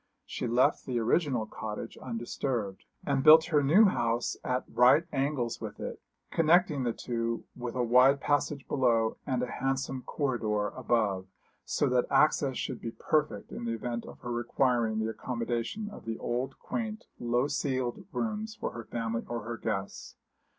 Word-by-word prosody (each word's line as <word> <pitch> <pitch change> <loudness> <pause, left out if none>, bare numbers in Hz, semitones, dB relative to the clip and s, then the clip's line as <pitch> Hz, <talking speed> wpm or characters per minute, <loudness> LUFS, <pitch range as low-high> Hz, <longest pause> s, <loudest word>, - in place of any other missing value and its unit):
She - - -4
left 120 +2 +2
the 125 -2 -1
original 120 0 +1
cottage 110 +1 -6
undisturbed, 115 -3 -3 0.2
and 140 -2 +1
built 160 +1 +9
her 150 - +5
new 165 +11 +6
house 120 - +1
at 125 0 0
right 125 +7 +5
angles 135 -4 -1
with - - -6
it, - - -6 0.3
connecting 165 -2 +3
the 120 -2 +1
two 115 0 -3
with 120 -1 -5
a 125 - +1
wide 125 +4 +5
passage 145 -1 0
below 115 -4 +2
and 130 -2 0
a 125 - -3
handsome 135 -1 -1
corridor 110 -8 -1
above, 105 -7 0 0.4
so 145 - +1
that 125 -1 +2
access 145 -3 +3
should 130 -4 -4
be 115 - -3
perfect 155 -1 0
in 120 - -6
the 115 - -1
event 120 +1 -4
of - - -10
her 120 - -5
requiring 120 -1 +1
the 110 0 0
accommodation 120 - -3
of - - -11
the 115 0 -3
old 125 +3 -3
quaint, 225 -2 -4
low 120 +2 +1
ceiled 130 +4 -2
rooms 220 -1 -3
for - - -4
her 115 -1 -8
family 115 0 -2
or 120 -2 -3
her 120 +1 -4
guests. 100 -3 -4
125 Hz, 165 wpm, -30 LUFS, 115-140 Hz, 0.4 s, built